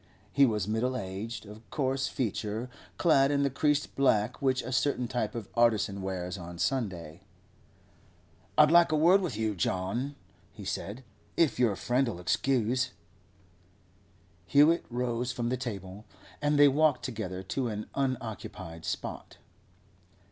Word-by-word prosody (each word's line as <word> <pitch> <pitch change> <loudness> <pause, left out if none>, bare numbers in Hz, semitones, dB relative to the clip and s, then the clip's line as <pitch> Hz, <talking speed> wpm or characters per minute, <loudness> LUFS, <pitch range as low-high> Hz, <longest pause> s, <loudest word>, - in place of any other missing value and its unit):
He 140 -1 +5
was 105 -5 -1
middle 120 +4 0
aged, 105 +2 -5 0.2
coarse 135 -1 0
of - - -8
feature, 110 0 -2 0.3
clad 140 -5 +4
in 140 -1 +2
the 140 - +1
creased 145 +2 0
black 110 -6 +2
which 130 -1 +1
a 130 - -5
certain 130 -1 +1
type 115 -3 -2
of 115 -4 -5
artisan 110 -4 +2
wears 95 0 -4
on 85 0 -8
Sunday. 90 - -2 1.4
'I'd 150 0 +7
like 170 -1 +6
a - - +3
word 175 +6 +5
with 160 - -3
you, 110 -1 0
John,' 100 +10 -2 0.4
he 105 - -11
said, 105 +7 -4 0.3
'if 160 -7 +2
your 115 -5 +3
friend'll 120 0 0
excuse.' 125 +5 +1 1.6
Hewett 150 - +5
rose 120 0 -1
from 120 -1 -2
the 130 - +1
table, 100 -4 -6 0.4
and 145 0 +2
they 145 0 +8
walked 145 -1 +3
together 95 -7 -4
to 130 +5 -2
an 105 -1 -4
unoccupied 115 -10 -4
spot. - - -5
120 Hz, 140 wpm, -29 LUFS, 105-135 Hz, 1.6 s, they